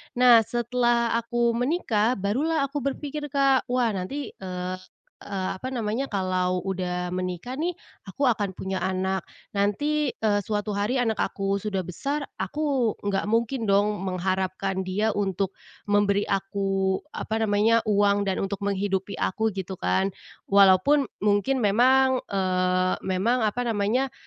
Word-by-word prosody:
Nah, 245 -1 +7
setelah 240 -1 +1
aku 235 0 0
menikah 245 -3 +1
barulah 275 +11 0
aku 275 +1 -2
berpikir, 290 +2 -4
Kak, 275 -2 +2
wah 245 -2 +1
nanti, 210 +9 -4
eee, 185 -1 -5 0.5
apa 195 +5 -3
namanya, 235 +2 -1
kalau 185 -3 -1
udah 180 -2 -3
menikah 185 +7 -4
nih, 340 +4 -1 0.3
aku 255 +8 0
akan 205 -4 -1
punya 190 +1 -4
anak, 190 0 -1 0.2
nanti, 270 +9 0
eee, 210 -2 +1
suatu 210 -1 -2
hari 235 +6 +1
anak 225 -3 0
aku 195 0 -1
sudah 200 -1 -2
besar 275 - -3 0.2
aku 260 +2 0
nggak 200 -1 -1
mungkin 230 +3 0
dong 205 +1 +2
mengharapkan 190 +1 -1
dia 205 +4 0
untuk 195 -1 -1 0.3
memberi 205 0 +3
aku, 195 -1 0 0.2
apa 220 +1 -2
namanya, 220 +3 +4
uang 200 -1 +3
dan 190 - -1
untuk 200 0 -5
menghidupi 200 -1 -1
aku 220 +4 0
gitu 190 0 -4
kan. 190 0 +1 0.3
Walaupun 200 +9 +5 0.2
mungkin 210 +4 +2
memang, 260 +5 +4
eee, 185 -1 +1
memang 200 +7 +1
apa 225 +3 0
namanya, 230 +4 0
205 Hz, 135 wpm, -25 LUFS, 190-245 Hz, 0.5 s, Nah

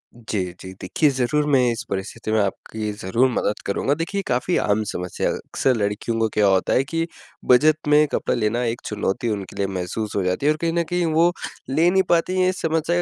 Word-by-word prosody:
जी, 110 -3 -4 0.2
जी। 95 - -8
देखिए, 145 - +2
ज़रूर 135 +3 0
मैं 135 -2 +4
इस 115 - -4
परिस्थिति 105 +3 -4
में 110 - +3
आपकी 105 +2 -3
ज़रूर 115 +8 +2
मदद 105 -2 -1
करूँगा। 135 +7 0
देखिए 185 +5 -2
काफ़ी 125 +8 +1
आम 105 +1 +1
समस्या, 90 -3 -3
अक्सर 130 -2 -1
लड़कियों 110 +2 -1
का 110 - +2
क्या 105 -1 +3
होता 95 -1 +2
है 130 - +3
कि 165 +4 -2 0.4
बजट 155 +4 +4
में 150 +1 +5
कपड़ा - - 0
लेना 115 +3 0
एक 115 0 -2
चुनौती 105 +2 -2
उनके 100 -3 -4
लिए 100 -1 0
महसूस 95 +3 -4
हो 100 - +1
जाती 90 +9 -1
है 150 - +5
और 155 - -1
कहीं 165 -1 0
न 170 0 +1
कहीं 175 -1 +1
वो 170 +2 +4 0.4
ले 160 +6 +3
नहीं 190 0 +3
पाती 175 +2 +2
हैं 185 - +4
इस 185 - -4
समस्या 165 +1 0
120 Hz, 210 wpm, -22 LUFS, 105-155 Hz, 0.4 s, में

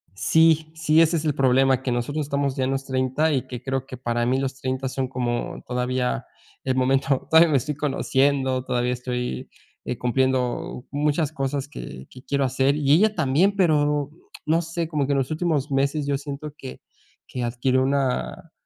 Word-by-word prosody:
Sí, 160 +7 +3
sí 160 0 +3
ese 165 +1 +3
es 160 - -3
el 150 - +2
problema, 130 0 +3
que 130 - -2
nosotros 145 +5 -2
estamos 140 -1 -1
ya 130 - 0
en 130 - -1
los 135 0 -2
30 130 +4 0
y 130 -2 -1
que 125 -1 -7
creo 135 0 -2
que 130 - -9
para 120 -1 -1
mí 130 +2 +1
los 135 0 -3
30 130 0 -2
son 130 0 -2
como 125 -2 -3
todavía 125 0 -1 0.4
el 130 -1 0
momento 135 +1 +1
todavía 160 +1 +7
me 145 - +3
estoy 150 +3 -2
conociendo, 135 -2 +1
todavía 125 -1 0
estoy, 125 - -4 0.4
eh, 125 - -3
cumpliendo 125 -1 -1
muchas 150 +1 0
cosas 135 -1 -3
que 65 - -9
que 125 - -13
quiero 140 +1 0
hacer, 135 +2 +2
y 145 -2 +1
ella 210 +8 +4
también, 160 +6 +2
pero, 150 -5 +2 0.3
no 160 +2 +2
sé, 165 0 -3
como 150 -4 -1
que 140 - +1
en - - +1
los 135 +2 -2
últimos 155 -3 -1
meses 140 +2 0
yo 140 -1 0
siento 145 +1 -7
que 65 - -9 0.5
que 125 - -4
adquirió 125 +2 +1
una, 130 - -1
135 Hz, 185 wpm, -24 LUFS, 130-150 Hz, 0.5 s, todavía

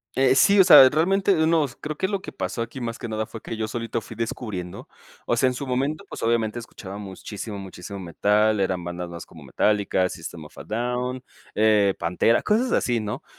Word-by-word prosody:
Eh, 130 0 +4
sí, 200 +9 +5
o - - +9
sea, 135 -8 +10
realmente, 190 +7 +2
unos 160 -5 +1
creo 155 0 -5
que 190 - -1
lo 200 -2 -2
que - - -9
pasó 95 +5 -4
aquí 120 +3 -6
más 115 -1 -4
que - - -5
nada 110 -1 -2
fue 115 - -9
que - - -6
yo 110 0 -3
solito 115 0 -3
fui 110 - -11
descubriendo 105 -6 -5 0.4
O 120 - 0
sea, 130 - +3
en 130 - 0
su 135 +3 -5
momento, 135 +4 -1
pues, - - -8
obviamente, 115 0 0
escuchaba 100 -4 -9
muchísimo 105 +1 -7
muchísimo 95 0 -8
metal, 105 +4 +1
eran 95 -2 -1
bandas 85 0 -5
más 85 0 -8
como - - -15
Metallica, 100 -3 +1
System 85 -1 -8
of 75 - -15
a 70 - -9
Down, 125 +4 -3 0.3
eh, 105 -2 +4
Pantera, 90 +7 +2
cosas 230 +4 +1
así, 120 -2 +1
¿no?, 110 +7 -5
115 Hz, 205 wpm, -24 LUFS, 100-130 Hz, 0.4 s, sea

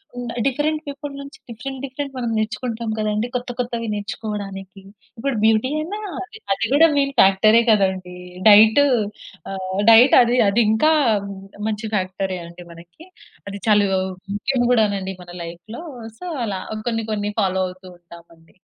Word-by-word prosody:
హ్మ్, 245 -1 -5 0.2
different 300 +3 0
people 285 +1 -6
నుంచి 280 0 -10
different 260 +4 -7
different 275 +1 -6
మనం 240 -2 -2
నేర్చుకుంటాం 225 +1 -3
కదండీ. 215 +2 -1
కొత్త, 250 0 -3
కొత్తవి 235 -2 -3
నేర్చుకోవడానికి 205 -2 -6 0.4
ఇప్పుడు 275 +3 -2
బ్యూటీ 220 +3 +3
అయినా 360 +7 -4 0.5
అది 195 - -2
కూడా 320 +3 +7
మెయిన్ 275 0 +1
ఫ్యాక్టరే 215 +4 +6
కదండీ. 190 -3 0 0.3
డైట్ 220 +5 +7
ఆహ్, 245 -6 +2 0.9
డైట్ 240 +4 +7
అది 240 +1 +2
అది 230 +4 +3
ఇంకా 265 +9 +3 0.8
మంచి 215 0 -3
ఫ్యాక్టరే 185 -1 -2
అండి 170 +1 -12
మనకి. 170 - -15 0.4
అది 200 0 -7
చాలా 210 -1 +5 0.5
ముఖ్యం 255 +4 0
కూడా 225 -3 +4
నండి 190 -1 -4
మన 175 - -13
లైఫ్‌లో. 175 - -9 0.4
సో, - - -8 0.2
అలా 195 -3 -3 0.3
కొన్ని, 225 -1 -2
కొన్ని 205 0 -2
ఫాలో 190 -1 0
అవుతూ 185 +1 -12
ఉంటామండి. 170 -1 -18
220 Hz, 140 wpm, -21 LUFS, 195-250 Hz, 0.9 s, కూడా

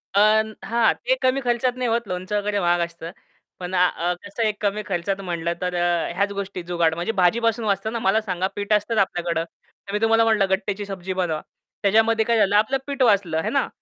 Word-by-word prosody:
अन 215 +1 +4 0.2
हां. 230 0 +3
ते - - +3
कमी 260 +1 +2
खर्चात 245 +1 +1
नाही 250 -1 -1
होत, 230 +1 +1
लोणचं 185 +3 -3
वगैरे 205 0 -1
महाग 175 -1 +2
असतं. 170 0 -9 0.5
पण 180 +1 -6
आ 180 0 +4
अ, 175 +1 -1
कसं 200 +3 -6
आहे 220 - +3
एक 210 - -4
कमी 210 0 0
खर्चात 195 +1 -2
म्हटलं 170 -1 -2
तर 180 0 -2
अ, 175 -1 0
ह्याच 200 +1 0
गोष्टी 200 -2 -5
जुगाड. 170 -2 +1
म्हणजे 175 +5 -2
भाजीपासून 230 +5 +2
वाचतं 200 +1 0
ना? 235 - -2
मला 215 +1 +2
सांगा 185 -3 -2
पीठ 205 +1 -1
असतंच 210 +2 +1
आपल्याकडं. 175 -4 0
तर 200 +3 -15
मी 210 - +1
तुम्हाला 225 0 +4
म्हणलं 215 -4 +2
गट्टेची 195 +1 -1
सब्जी 190 -1 -5
बनवा. 175 -4 -1 0.4
त्याच्यामध्ये 220 +2 +3
काय 230 0 +2
झालं 205 -1 +3
आपलं 220 +6 +3
पीठ 280 -1 -4
वाचलं 195 -8 +2
है - - -1
ना. 275 -1 +1
200 Hz, 215 wpm, -23 LUFS, 180-220 Hz, 0.5 s, अन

